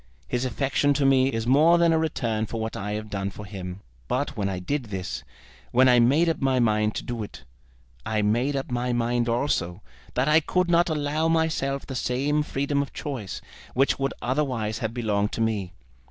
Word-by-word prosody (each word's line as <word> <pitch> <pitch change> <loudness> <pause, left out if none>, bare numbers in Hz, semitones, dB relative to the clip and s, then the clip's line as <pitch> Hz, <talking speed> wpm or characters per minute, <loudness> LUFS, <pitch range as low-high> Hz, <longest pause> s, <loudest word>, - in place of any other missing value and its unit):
His 120 - -1
affection 140 +2 +1
to 140 0 +1
me 135 0 +4
is 115 0 -2
more 155 +7 +5
than 170 -1 +4
a 160 - +3
return 115 -9 -1
for 115 - -4
what 110 0 -3
I 105 +1 -3
have 105 0 -5
done 100 -1 -2
for 105 +1 -9
him. 95 -1 -7 0.3
But - - -1
when 100 -1 -1
I 95 - -3
did 125 +9 -2
this, 90 - -5 0.5
when 130 +2 +5
I 125 -1 +6
made 140 +8 +4
up 165 - 0
my 135 -1 +2
mind 110 -2 +2
to - - -3
do 120 -2 -4
it, 100 -10 -8 0.6
I 110 +4 0
made 120 +7 +1
up 135 -2 -3
my 125 0 0
mind 120 0 0
also 105 -7 -1 0.3
that 125 +3 +1
I 155 +1 +6
could 175 +3 0
not 170 +1 +4
allow 155 +1 0
myself 160 -4 0
the 135 - -6
same 135 +4 0
freedom 140 -1 -1
of 140 - -6
choice 125 -10 -5 0.3
which 135 +2 +2
would 135 0 -1
otherwise 125 -5 -1
have 110 -2 -2
belonged 105 -3 -1
to - - -2
me. 105 -5 -1
125 Hz, 200 wpm, -25 LUFS, 110-145 Hz, 0.6 s, I